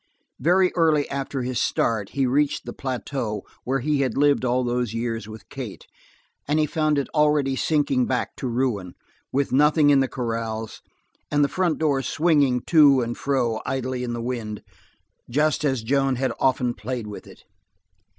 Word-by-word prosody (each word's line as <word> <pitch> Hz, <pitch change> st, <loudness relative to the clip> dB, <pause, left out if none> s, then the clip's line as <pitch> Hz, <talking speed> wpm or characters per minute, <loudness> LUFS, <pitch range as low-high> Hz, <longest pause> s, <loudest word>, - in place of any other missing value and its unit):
Very 180 Hz, +6 st, +3 dB
early 155 Hz, -4 st, +3 dB
after 135 Hz, -1 st, -3 dB
his 125 Hz, 0 st, -1 dB
start 110 Hz, -4 st, 0 dB
he 135 Hz, -, +3 dB
reached 140 Hz, +3 st, +1 dB
the -, -, -6 dB
plateau 125 Hz, -5 st, -4 dB, 0.2 s
where 135 Hz, +1 st, 0 dB
he 145 Hz, +1 st, +1 dB
had 130 Hz, -4 st, -1 dB
lived 145 Hz, -1 st, +3 dB
all 125 Hz, 0 st, +1 dB
those 120 Hz, -2 st, -1 dB
years 115 Hz, -2 st, -3 dB
with 110 Hz, 0 st, -11 dB
Kate, -, -, -7 dB, 0.6 s
and 150 Hz, +2 st, +1 dB
he 155 Hz, -, +3 dB
found 155 Hz, 0 st, 0 dB
it 140 Hz, -, 0 dB
already 150 Hz, -3 st, +2 dB
sinking 140 Hz, -4 st, +1 dB
back 125 Hz, -, -2 dB
to 130 Hz, -, -3 dB
ruin, 115 Hz, -7 st, -1 dB, 0.4 s
with 140 Hz, +1 st, 0 dB
nothing 150 Hz, +2 st, +4 dB
in 140 Hz, -, +5 dB
the 135 Hz, -, +2 dB
corrals, 115 Hz, -3 st, -4 dB, 0.5 s
and 145 Hz, 0 st, +2 dB
the -, -, +4 dB
front 175 Hz, 0 st, 0 dB
door 145 Hz, -4 st, +1 dB
swinging 145 Hz, -5 st, +2 dB
to 145 Hz, -4 st, +5 dB
and 120 Hz, 0 st, -3 dB
fro 125 Hz, -5 st, 0 dB
idly 130 Hz, -1 st, -3 dB
in 120 Hz, -1 st, -3 dB
the 120 Hz, -1 st, -4 dB
wind, 115 Hz, -4 st, -4 dB, 0.7 s
just 150 Hz, +5 st, +1 dB
as 135 Hz, -6 st, 0 dB
Joan 135 Hz, +2 st, +1 dB
had 130 Hz, +2 st, -1 dB
often 125 Hz, -2 st, +1 dB
played 120 Hz, 0 st, -5 dB
with 105 Hz, -1 st, -9 dB
it. -, -, -15 dB
130 Hz, 170 wpm, -24 LUFS, 120-145 Hz, 0.7 s, in